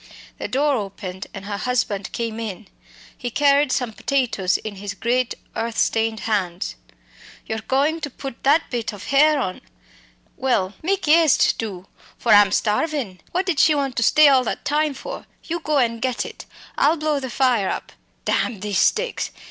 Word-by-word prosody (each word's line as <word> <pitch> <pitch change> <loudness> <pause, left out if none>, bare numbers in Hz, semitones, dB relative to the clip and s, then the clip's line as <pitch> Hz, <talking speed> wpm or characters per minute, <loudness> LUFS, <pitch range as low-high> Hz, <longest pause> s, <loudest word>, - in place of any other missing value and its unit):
The - - -3
door 280 +1 +1
opened 190 -2 -6
and 195 0 -9
her 205 0 -3
husband 215 -6 -1
came 230 -1 -3
in. 215 -2 -6 0.5
He 245 - -4
carried 280 +1 +3
some 250 -4 -1
potatoes 235 -9 0
in 210 -2 -7
his 200 +1 -6
great 245 +3 0 0.2
earth 230 0 -3
stained 225 -1 +1
hands. 190 -5 -1 0.7
"You're 220 - -3
goin' 290 +7 +1
to 295 - -3
put 270 -1 -8
that 295 +4 +2
bit 230 -3 -2
of 205 -1 -9
hare 300 +4 +4
on? 185 -8 -3 0.8
Well, 210 -7 0
mak' 390 +4 0
eëaste, 320 -1 +4
do, 195 -5 -5 0.3
for 235 - 0
I'm 205 -1 +7
starvin'. 215 - -1
What 365 +2 0
did 365 -6 0
she 310 - +5
want 275 -3 -1
to - - +2
stay 300 +6 +6
all 265 -2 +5
that - - -4
time 295 0 +1
for? - - -8 0.2
You 340 +1 -3
go 305 -2 0
and 230 -3 +1
get 255 -1 -1
it. - - -9 0.3
I'll 305 +4 +4
blow 305 -1 0
the 260 -1 -5
fire 240 -6 +2
up - - -4 0.3
damn 220 -7 0
these 205 -3 0
sticks! 480 +2 +1
245 Hz, 175 wpm, -22 LUFS, 210-290 Hz, 0.8 s, I'm